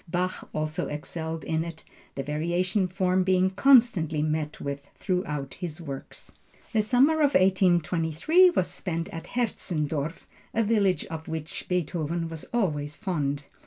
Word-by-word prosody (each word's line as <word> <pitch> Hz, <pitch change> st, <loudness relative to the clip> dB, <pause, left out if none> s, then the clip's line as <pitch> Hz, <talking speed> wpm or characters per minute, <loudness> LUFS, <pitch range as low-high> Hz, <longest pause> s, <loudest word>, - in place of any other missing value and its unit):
Bach 180 Hz, +2 st, -2 dB
also 155 Hz, +3 st, -2 dB
excelled 160 Hz, +1 st, -4 dB
in 160 Hz, +1 st, 0 dB
it, 165 Hz, -1 st, -8 dB, 0.3 s
the 135 Hz, -, -3 dB
Variation 175 Hz, +6 st, 0 dB
form 185 Hz, 0 st, +1 dB
being 185 Hz, 0 st, +3 dB
constantly 195 Hz, -, +4 dB
met 155 Hz, -1 st, -2 dB
with 140 Hz, 0 st, -5 dB
throughout 150 Hz, -8 st, -2 dB
his 170 Hz, -2 st, -6 dB
works. 140 Hz, -5 st, -7 dB, 0.4 s
The 220 Hz, -, +4 dB
summer 260 Hz, +8 st, +4 dB
of 290 Hz, -1 st, +3 dB
1823 185 Hz, -, +4 dB
was 185 Hz, -, +1 dB
spent 165 Hz, -2 st, -4 dB
at 165 Hz, -, -7 dB
Hetzendorf, 160 Hz, -, -2 dB, 0.3 s
a 230 Hz, -, +3 dB
village 205 Hz, -4 st, +2 dB
of 160 Hz, -1 st, -7 dB
which 160 Hz, -1 st, -5 dB
Beethoven 170 Hz, -1 st, -1 dB
was 165 Hz, -1 st, -7 dB
always 150 Hz, -10 st, -1 dB
fond. 145 Hz, -8 st, -2 dB
170 Hz, 135 wpm, -27 LUFS, 155-190 Hz, 0.4 s, constantly